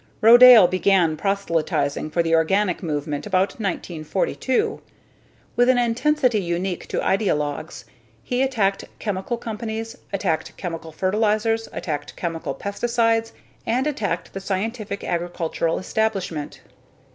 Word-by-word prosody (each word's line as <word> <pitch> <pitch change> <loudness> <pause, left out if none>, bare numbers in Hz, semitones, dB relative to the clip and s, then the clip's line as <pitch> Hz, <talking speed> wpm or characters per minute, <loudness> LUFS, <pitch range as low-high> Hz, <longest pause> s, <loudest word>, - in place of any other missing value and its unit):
Rodale 240 -2 +9
began 185 -3 +2
proselytizing 160 -6 -1
for 170 +2 +1
the 165 0 0
organic 180 +3 +2
movement 150 -1 -3
about 190 0 +2
1942. 195 - -2 0.7
With 245 +2 +4
an 255 - +5
intensity 245 0 +2
unique 175 +1 -3
to - - -4
ideologues, 150 - -1 0.4
he 250 +1 -1
attacked 220 -8 0
chemical 205 +3 -3
companies, 225 0 -5 0.2
attacked 185 -5 -2
chemical 165 -3 -6
fertilizers, 215 +5 0
attacked 150 -4 -5
chemical 165 -2 -4
pesticides, 225 +2 0 0.4
and 250 +4 +1
attacked 205 - -2
the 195 - -4
scientific 200 +2 -3
agricultural 170 -1 -2
establishment. 190 -7 -2
195 Hz, 110 wpm, -22 LUFS, 170-225 Hz, 0.7 s, Rodale